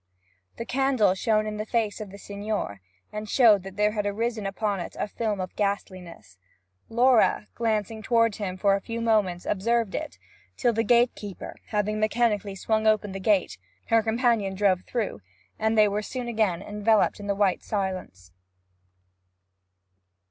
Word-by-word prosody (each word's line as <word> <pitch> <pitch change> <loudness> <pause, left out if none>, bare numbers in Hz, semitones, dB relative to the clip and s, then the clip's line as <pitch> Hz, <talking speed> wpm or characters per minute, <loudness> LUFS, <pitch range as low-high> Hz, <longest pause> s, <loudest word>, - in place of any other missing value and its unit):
The 230 - -5
candle 260 -7 +2
shone 215 +2 +1
in 210 0 -4
the 215 - -3
face 220 -3 -1
of 210 - -6
the 200 - -11
Signor 200 - -4 0.3
and 210 0 -5
showed 220 -6 +5
that 190 0 -10
there 210 0 +3
had 210 -1 -2
arisen 220 0 -2
upon 200 0 -2
it 175 - -6
a - - -1
film 210 -1 -2
of 185 -1 -5
ghastliness. 185 - -4 0.5
Laura, 235 -2 +3
glancing 220 -1 -1
toward 230 -2 +2
him 190 -4 -4
for 200 +1 +3
a 200 - -3
few 230 +3 -5
moments 210 -6 +1
observed 225 +1 0
it, 310 - -5 0.4
till, 240 -2 +2
the 225 - +1
gatekeeper 235 -5 0
having 210 0 -1
mechanically 215 -2 +1
swung 220 +3 0
open 215 -2 +2
the 195 - -5
gate, 195 -1 +1 0.3
her 225 -1 +5
companion 225 -3 +1
drove 190 -2 +2
through, 220 - -3 0.4
and 220 +1 +1
they 210 -1 +6
were 205 +1 -1
soon 250 +3 -5
again 215 -6 0
enveloped 210 +1 +1
in 205 - -7
the 200 - 0
white 195 -2 +1
silence. 185 - -4
210 Hz, 160 wpm, -26 LUFS, 195-225 Hz, 0.5 s, they